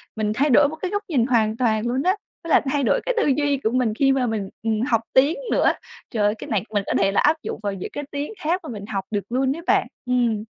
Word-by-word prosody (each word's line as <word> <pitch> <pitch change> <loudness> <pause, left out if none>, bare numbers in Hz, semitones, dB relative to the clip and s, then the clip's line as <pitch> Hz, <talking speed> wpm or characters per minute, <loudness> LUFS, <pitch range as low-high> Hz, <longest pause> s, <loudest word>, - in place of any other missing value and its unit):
mình 215 -1 -1
thay 285 +6 +1
đổi 285 +3 +6
một 315 - -6
cái 365 +3 -4
góc 410 0 -1
nhìn 255 -7 +2
hoàn 225 -3 +1
toàn 225 -2 +1
luôn 255 +3 0
á, 370 +2 +3 0.3
với 335 - -7
lại - - +5
thay 285 -2 +1
đổi - - +2
cái - - +1
tư 455 - +2
duy 285 0 +2
của 220 - +1
mình 250 -4 +1
khi 270 +4 +3
mà 265 -2 +1
mình, 210 -4 -2
ừm, 220 -1 0
học 235 -3 +1
tiếng 280 - +4
nữa. - - +4 0.4
Trời 215 -4 0
ơi, 210 +1 +2
cái - - -9
này 205 -5 0
mình 205 -1 +1
có - - 0
thể 195 0 +2
là - - +2
áp 305 +2 +4
dụng - - -5
vào 200 -1 -1
những 185 - -6
cái 290 - -4
tiếng 290 +8 -4
khác 340 +4 0
mà 310 - -8
mình 205 -3 -6
học 195 -3 -3
được 205 -2 -2
luôn 265 +2 +1
ấy 335 - -7
bạn. - - +3 0.2
Ừm. 240 -4 +1
250 Hz, 285 wpm, -23 LUFS, 215-290 Hz, 0.4 s, đổi